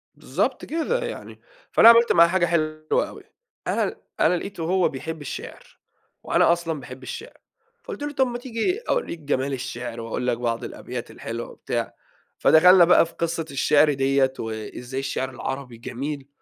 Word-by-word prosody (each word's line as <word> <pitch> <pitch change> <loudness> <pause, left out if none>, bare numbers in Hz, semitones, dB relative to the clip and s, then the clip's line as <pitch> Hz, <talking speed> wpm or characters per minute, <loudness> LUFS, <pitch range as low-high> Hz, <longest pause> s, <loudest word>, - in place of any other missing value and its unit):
بالضبط - - -2
كده 335 +11 -1
يعني، - - -8 0.3
فأنا 230 - +8
عملت 235 0 +6
معاه 170 0 +7
حاجة 175 0 +2
حلوة 155 -2 0
أوي، - - -12 0.4
أنا - - +1
ل - - -4 0.2
أنا 180 - +4
لقيته 185 -2 -6
هو 185 +2 +2
بيحب 160 +3 -6
الشِعر - - -9 0.4
وأنا - - +3
أصلًا 165 -3 -3
باحب 130 +1 -10
الشِعر، 460 - -8 0.5
فقُلت 450 -12 -7
له: 295 - -3
"طَب 265 -1 +2
ما 240 0 -4
تيجي 245 - -2
أورّيك 475 - -1
جمال 140 -2 -1
الشِعر 120 -3 -5
وأقول 115 +2 -3
لك 120 -2 +1
بعض 120 0 -2
الأبيات 125 -1 -7
الحلوة،" 115 +1 -6
وبتاع. 120 -1 -4 0.4
فدخلنا 180 +2 +7
بقى 175 -1 +6
في 165 - -13
قِصّة 165 -1 -2
الشِعر 145 +2 +4
ديّة 135 0 +2
وإزاي 115 +4 -5
الشِعر 135 -1 -2
العربي 130 -1 -6
جميل 135 +4 -5
150 Hz, 160 wpm, -24 LUFS, 125-180 Hz, 0.5 s, فأنا